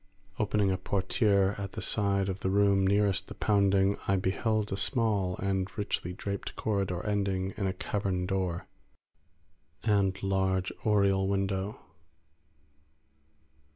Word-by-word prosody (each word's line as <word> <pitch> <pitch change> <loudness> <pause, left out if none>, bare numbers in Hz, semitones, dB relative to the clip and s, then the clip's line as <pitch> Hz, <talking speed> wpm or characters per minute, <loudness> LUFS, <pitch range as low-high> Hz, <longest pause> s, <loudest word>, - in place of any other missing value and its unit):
Opening 105 -2 +2
a 95 - -1
portiere 100 +1 +2
at 100 -1 -5
the - - -5
side 100 -2 +1
of 95 0 -3
the 95 - -1
room 100 -1 +3
nearest 100 -1 +2
the - - -9
pounding, 100 -1 +2
I 100 - +3
beheld 105 +3 0
a - - 0
small 100 -3 +1
and 95 -1 -1
richly 100 -4 -2
draped 100 +2 -5
corridor 95 -4 -1
ending 100 -2 -1
in 100 - -1
a 95 - -1
carven 95 -1 -2
door 90 -3 -2 1.2
and 100 -3 +2
large 95 -1 0
oriel 100 -2 +3
window. 100 0 -1
100 Hz, 125 wpm, -29 LUFS, 95-100 Hz, 1.2 s, room